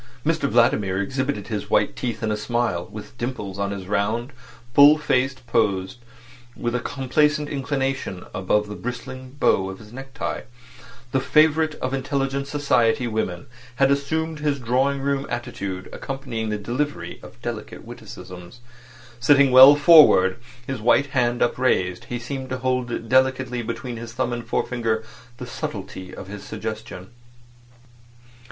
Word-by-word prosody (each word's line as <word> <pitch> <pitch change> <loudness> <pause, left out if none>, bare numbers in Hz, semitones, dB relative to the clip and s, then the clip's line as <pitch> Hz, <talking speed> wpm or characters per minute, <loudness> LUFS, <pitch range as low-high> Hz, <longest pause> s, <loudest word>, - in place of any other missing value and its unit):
Mr 155 -3 +1
Vladimir 105 -5 +2
exhibited 130 0 -2
his 105 -2 -4
white - - +2
teeth 120 -2 -4
in 110 - 0
a - - +1
smile, 105 -5 -1
with 110 +2 -9
dimples 105 -6 -4
on 100 0 0
his 100 -2 -5
round, 110 +6 -1 0.4
full 145 +3 +8
face 135 -3 +1
posed 115 -4 -1 0.6
with 120 0 -2
a 125 - +1
complacent 150 +3 +1
inclination 135 -8 -3
above 100 +3 +1
the 105 - -7
bristling 130 +3 -7
bow 95 -8 +2
of 95 - -7
his 110 +2 -14
neck 135 +1 -9
tie. - - -4 0.7
The 130 - +2
favourite 155 +2 +3
of 130 +1 -4
intelligent 135 0 -1
society 135 -5 +2
women 110 -6 -2 0.3
had 135 +2 +3
assumed 160 +3 -1
his 150 -2 0
drawing 130 +3 +1
room 140 0 -1
attitude 100 -6 -5
accompanying 130 -5 -4
the 105 - -1
delivery 125 +8 -3
of - - -13
delicate - - -6
witticisms. 90 +3 -10 0.6
Sitting 140 +2 +5
well 130 +3 +10
forward, 145 - +6 0.3
his 130 -3 -4
white 130 +4 +3
hand 120 -2 +1
upraised, 95 -8 0
he 120 - -4
seemed 130 +2 -6
to 130 - -2
hold 125 -2 -2
delicately 130 0 +2
between 120 +1 -5
his 115 0 -8
thumb 120 0 -1
and 120 -1 -5
forefinger 115 -2 -1 0.3
the 125 - -7
subtlety 95 -5 -6
of - - -9
his 100 0 -8
suggestion. 110 -2 -7
125 Hz, 145 wpm, -23 LUFS, 110-135 Hz, 0.7 s, well